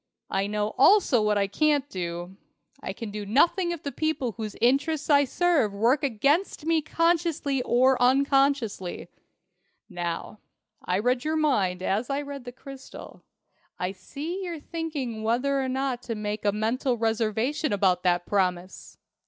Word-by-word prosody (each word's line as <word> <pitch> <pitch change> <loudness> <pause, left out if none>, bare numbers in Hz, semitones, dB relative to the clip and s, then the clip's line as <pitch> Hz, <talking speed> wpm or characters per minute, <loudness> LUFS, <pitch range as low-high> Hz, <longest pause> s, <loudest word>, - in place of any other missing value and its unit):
I 195 +1 0
know 210 +1 -2
also 285 - +5
what 210 -1 +2
I 200 - +2
can't 285 +7 +1
do. 175 -2 -5 0.5
I - - -4
can 215 +1 -7
do 210 0 -5
nothing 335 - +2
if 340 -2 -4
the 280 - -3
people 310 -6 -1
whose 215 -1 -6
interests 290 +5 +1
I 285 0 +6
serve 300 - +1
work 240 +8 +2
against 280 - +1
me 325 -1 +2
consciously 330 -4 0
or 250 +1 +3
unconsciously. 270 -7 +1 0.8
Now, 175 +2 -5 0.4
I 180 - 0
read 245 +4 +1
your 310 +1 0
mind 195 -12 +1
as 215 +8 -1
I 280 +1 -1
read 280 -3 -8
the 245 - -6
crystal. 270 +2 -11 0.6
I 180 +1 -2
see 295 - -6
you're 340 -3 -5
thinking 295 -8 -4
whether 250 +5 +1
or 260 - -2
not 260 -1 -2
to 230 - -1
make 210 0 -4
a 205 - +4
mental 235 +4 -1
reservation 225 +6 0
about 190 -3 +2
that 175 -1 +1
promise! 185 -2 -2
250 Hz, 155 wpm, -26 LUFS, 210-290 Hz, 0.8 s, I